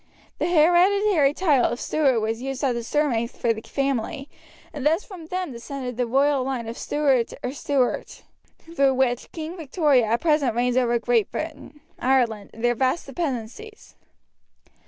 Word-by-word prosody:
The - - 0
hereditary 350 -1 +4
title 295 -9 +3
of 240 - -4
Steward 270 -7 +1
was 225 +2 -2
used 270 +1 -4
as 265 -3 +2
the 235 0 -4
surname 235 -3 0
for 235 -1 -1
the 220 - -8
family, 275 +1 -2 0.5
and 285 - -6
thus 320 +6 +2
from 355 -6 -11
them 365 -2 -3
descended 250 +1 -6
the 245 0 -1
royal 275 +2 +2
line 255 -3 -3
of 230 - -5
Stewart 270 -6 +1
or 250 - -2
Stuart, 270 -2 -2 0.3
through 275 -5 0
which 255 -2 0
Queen 320 +1 -6
Victoria 295 -6 +2
at 230 +2 0
present 300 -8 +2
reigns 245 +1 +1
over 240 -2 +2
Great 235 -2 +1
Britain, 310 -1 -7 0.2
Ireland, 240 -5 +1
and 225 - -11
their 240 0 +3
vast 260 +7 0
dependencies. 280 - -6
270 Hz, 160 wpm, -24 LUFS, 240-310 Hz, 0.5 s, hereditary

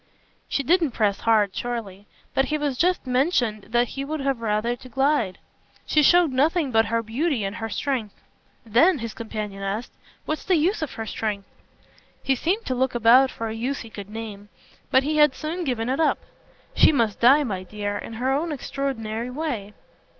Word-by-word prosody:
She 280 - 0
didn't 325 -2 +2
press 205 -4 +1
hard, 210 -4 +2
surely; 210 -5 -5 0.3
but 270 - +2
he 305 - -1
had 290 -3 -1
just 355 +5 +1
mentioned 250 - +1
that 240 +1 +2
he 275 - -5
would 310 +2 -4
have 270 -3 -1
rather 220 +2 0
to 255 - -13
glide. 270 -6 +1 0.5
"She 305 - +3
showed 345 +1 +5
nothing 295 +2 +1
but 225 -1 +4
her 230 +1 0
beauty 250 +2 -1
and 195 +2 -3
her 225 0 -4
strength." 235 -3 -2 0.5
"Then," 275 - +4
his 230 -3 -5
companion 215 -3 -6
asked, 200 +5 -3 0.3
"what's 310 - -3
the 375 - +2
use 340 +6 +1
of 310 - -3
her 225 - -5
strength?" 210 -2 -3 0.8
He 270 - +2
seemed 365 - -1
to 260 - -1
look 255 0 0
about 240 +3 +6
for 230 - -5
a - - -4
use 250 +5 -3
he 230 - -11
could 200 -2 -8
name; 210 -2 -8 0.4
but 260 - +4
he 305 +2 -1
had 295 -3 +5
soon 330 +3 -4
given 240 -4 -1
it 265 +3 -1
up. 320 - +3 0.6
"She - - +6
must 230 -8 0
die, 270 +5 +6
my 195 -8 -3
dear, 205 +2 -4
in 215 - -6
her 250 +4 -1
own 315 +4 -1
extraordinary 245 -5 -3
way." 250 -8 -4
245 Hz, 190 wpm, -24 LUFS, 220-290 Hz, 0.8 s, about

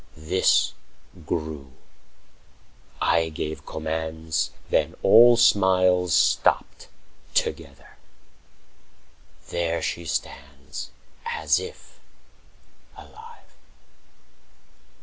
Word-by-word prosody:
This 80 0 +2 0.5
grew; 75 -5 -5 1.3
I 85 -1 +1
gave 75 0 -6
commands;45 80 0 -3 0.2
Then - - +1
all 120 +1 +7
smiles 95 -6 +3
stopped - - +1 0.5
together. - - -3 1.5
There 85 -1 -1
she 85 - -3
stands 70 -1 -6 0.3
As 465 -1 0
if 460 - -11 1.0
alive. 460 +2 -15
85 Hz, 65 wpm, -24 LUFS, 80-95 Hz, 1.5 s, all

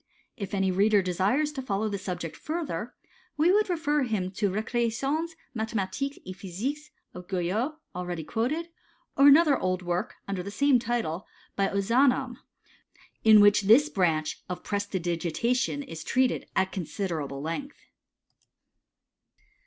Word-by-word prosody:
Tf 200 0 -4
any 190 -1 +1
reader 200 +2 +3
desires 200 - +1
to 280 -3 -5
follow 215 -3 -1
the 200 -2 -3
subject 175 -4 -5
further, 325 0 -4 0.4
we 320 +4 +4
would 420 +1 +3
refer 300 -4 +1
him 210 -7 -1
to 205 +2 0
the - - -2
Recreations 255 +9 -1 0.2
Mathematiques 225 +5 -2
et 185 - -7
Physiques 235 - -5 0.2
of 180 0 -10
Guyot, 195 - -1 0.2
already 175 -2 -4
quoted, 290 - -2 0.5
or 275 - +6
another 290 0 +6
old 185 0 -1
work, 175 +6 -2
under 195 -2 -2
the 190 - -6
same 275 +4 +3
title, 225 -7 -2 0.3
by 195 -1 +2
Ozanam, 245 +5 +2 0.9
in 215 -1 +8
which 205 0 +6
this 230 +9 +5
branch 165 - 0
oi - - -1
prestidigitation 200 - -1
is 165 - -8
treated 255 +5 +1
at 190 0 +1
considerable 165 -6 -4
length. 270 - -4
210 Hz, 135 wpm, -27 LUFS, 185-270 Hz, 0.9 s, in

